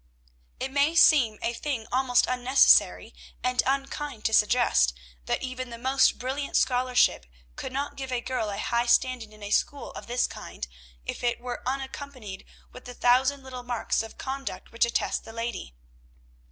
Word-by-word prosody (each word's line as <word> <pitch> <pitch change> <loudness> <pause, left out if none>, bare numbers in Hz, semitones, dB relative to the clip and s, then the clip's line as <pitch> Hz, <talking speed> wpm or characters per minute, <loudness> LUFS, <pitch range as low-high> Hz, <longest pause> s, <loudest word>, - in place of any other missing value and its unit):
It 265 - -3
may 285 +4 +2
seem 255 -10 +6
a 235 - 0
thing 245 -3 -3
almost 250 -1 +3
unnecessary 255 +2 +4 0.3
and 250 0 +2
unkind 275 -2 -3
to 220 - +1
suggest, 210 - +4 0.3
that - - -1
even 255 -1 -5
the 235 - -8
most 260 +2 +3
brilliant 270 +3 -2
scholarship 250 - +2 0.3
could - - -6
not 280 +2 -3
give 265 -1 -5
a 250 - 0
girl 240 -3 -2
a 200 - -4
high 235 +3 0
standing 245 -3 +2
in 215 -1 -14
a 205 - -6
school 285 +5 0
of - - -10
this 245 +1 +1
kind, - - -7 0.4
if - - -5
it 240 -1 0
were 245 0 -6
unaccompanied 265 -6 -5 0.3
with - - -13
the 245 -1 -9
thousand 260 +3 +3
little 255 -1 -7
marks 245 -2 -1
of 225 0 -9
conduct 270 0 -6
which 230 - +2
attest 235 - -1
the 225 - -11
lady. 230 - -5
250 Hz, 165 wpm, -27 LUFS, 235-265 Hz, 0.4 s, seem